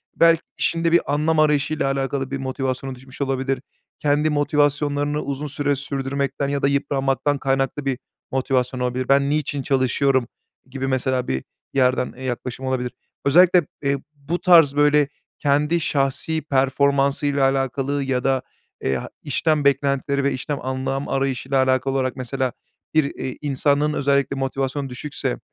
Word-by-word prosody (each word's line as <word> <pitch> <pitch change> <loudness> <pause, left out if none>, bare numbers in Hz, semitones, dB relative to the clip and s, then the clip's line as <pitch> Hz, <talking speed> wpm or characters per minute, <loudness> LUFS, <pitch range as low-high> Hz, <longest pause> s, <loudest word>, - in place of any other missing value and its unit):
belki 165 -1 +5 0.2
işinde 165 0 +1
bir 170 -3 +2
anlam 155 +2 +2
arayışıyla 150 -1 +2
alakalı 135 0 -2
bir 135 - -1
motivasyonu 130 0 -3
düşmüş 130 +2 -12
olabilir, 135 -1 -1 0.4
kendi 150 +1 +2
motivasyonlarını 145 0 +1
uzun 140 +2 -4
süre 145 0 0
sürdürmekten 140 0 -2
ya 140 0 -1
da 140 - +3
yıpranmaktan 140 0 0
kaynaklı 135 +1 -1
bir 135 -1 -1 0.3
motivasyon 130 -1 0
olabilir, 125 +1 -2
"Ben 140 0 +4
niçin 145 -1 -1
çalışıyorum?" 130 -2 +2 0.4
gibi, 135 0 -3
mesela, 130 -1 0
bir 65 0 -2 0.3
yerden, 130 -1 +2
eee, 130 - -9
yaklaşım 125 +1 -4
olabilir. 125 -2 -1 0.3
Özellikle, 175 +4 +6 0.2
eee, 140 0 +1 0.2
bu 145 +5 -3
tarz, 165 -6 +6
böyle, 145 0 +4 0.3
kendi 150 +4 +2
şahsi 145 +1 0
performansıyla 140 0 +1
alakalı 135 +1 -1
ya 130 -2 -1
da, 135 -1 +2 0.4
eee, 65 - 0
ha - - -5
işten 150 +1 +1
beklentileri 140 0 +1
ve 140 - +2
işten 145 +3 -3
anlam 130 +1 -2
arayışıyla 135 0 +1
alakalı 130 +1 +1
olarak, 130 -1 0
mesela, 130 0 -2 0.4
bir, 155 - +4
eee, 130 - -5
insanın 145 +1 +1
özellikle 140 -1 +1
motivasyon 135 +1 -2
düşükse, 130 0 -3
140 Hz, 140 wpm, -22 LUFS, 130-145 Hz, 0.4 s, Özellikle